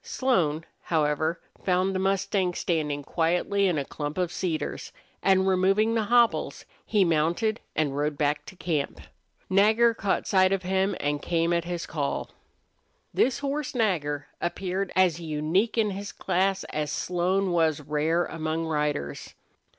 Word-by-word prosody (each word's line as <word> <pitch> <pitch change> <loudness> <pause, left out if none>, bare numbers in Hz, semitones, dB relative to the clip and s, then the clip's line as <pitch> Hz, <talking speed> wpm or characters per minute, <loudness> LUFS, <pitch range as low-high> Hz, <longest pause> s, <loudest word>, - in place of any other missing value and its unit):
Slone, 165 - 0 0.2
however, 155 +1 0 0.2
found 185 +1 +1
the 185 - -1
mustang 195 -1 0
standing 150 -4 -1
quietly 180 +6 +1
in 175 -4 +1
a 140 - -1
clump 150 +3 -5
of 180 -2 0
cedars, 165 -4 -3 0.3
and, 190 0 +3
removing 195 +4 +3
the 225 -2 +1
hobbles, 235 +1 +2 0.2
he 205 -3 +2
mounted 170 +8 +1 0.2
and 145 -3 0
rode 145 0 -1
back 145 0 0
to - - -10
camp. 155 -6 -2 0.5
Nagger 220 +5 +4
caught 200 -3 -1
sight 185 -1 +4
of 195 -1 0
him 190 +1 +1
and 145 0 -1
came 170 0 +1
at 170 -1 0
his 175 -1 -3
call. 145 -3 -3 0.8
This 255 -1 +2
horse 285 -1 -3
Nagger 150 -11 0 0.2
appeared 185 +2 -2
as 180 -3 +3
unique 160 +8 0
in 215 -2 +2
his 200 +1 -6
class 190 +1 0
as 150 -1 -2
Slone 180 +2 0
was 160 -3 +2
rare 150 +4 0
among 160 0 -3
riders. 150 - -2
180 Hz, 145 wpm, -26 LUFS, 155-195 Hz, 0.8 s, Nagger